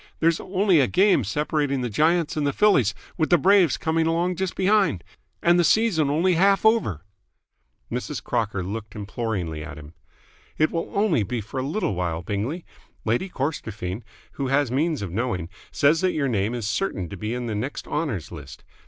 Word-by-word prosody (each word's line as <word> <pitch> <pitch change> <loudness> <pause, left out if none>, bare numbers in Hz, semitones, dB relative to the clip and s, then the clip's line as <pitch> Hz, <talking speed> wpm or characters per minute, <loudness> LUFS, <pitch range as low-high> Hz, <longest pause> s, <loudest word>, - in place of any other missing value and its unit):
There's 165 0 +2
only 190 -2 +2
a 135 - +4
game 190 - +3
separating 145 +3 -1
the 125 - -1
Giants 160 - +2
and 150 -2 0
the 140 - 0
Phillies, 140 - +3 0.2
with 160 - +1
the 175 - +6
Braves 185 -2 +4
coming 160 0 0
along 170 +2 0
just 190 +1 -3
behind. 195 - +2 0.4
And 175 +1 +5
the - - +4
season 170 -6 +3
only 170 +6 +2
half 195 +4 +3
over!" 155 - +2 0.9
Mrs. - - -4
Crocker 105 -4 -1
looked 105 +2 -6
imploringly 100 -7 -3
at 75 -2 -8
him. 75 +1 -11 0.6
"It 155 - +2
will 165 0 -3
only 200 - +2
be 115 +4 -2
for 110 +5 -6
a - - -1
little 165 - -1
while, 85 -2 -2
Bingley. 110 - -3 0.4
Lady 120 - 0
Corstorphine, 110 - -4 0.3
who 140 - -3
has 135 -1 +1
means 150 -1 0
of 95 - -5
knowing, 95 -5 -2 0.2
says 155 +3 +3
that 185 -1 +1
your 145 -3 0
name 110 -1 0
is 115 -4 -3
certain 100 - -2
to - - -7
be 105 +5 -4
in 125 -1 -4
the 115 - -3
next 120 +7 -4
Honours 140 - -3
List. 75 -5 -10
140 Hz, 185 wpm, -24 LUFS, 105-170 Hz, 0.9 s, the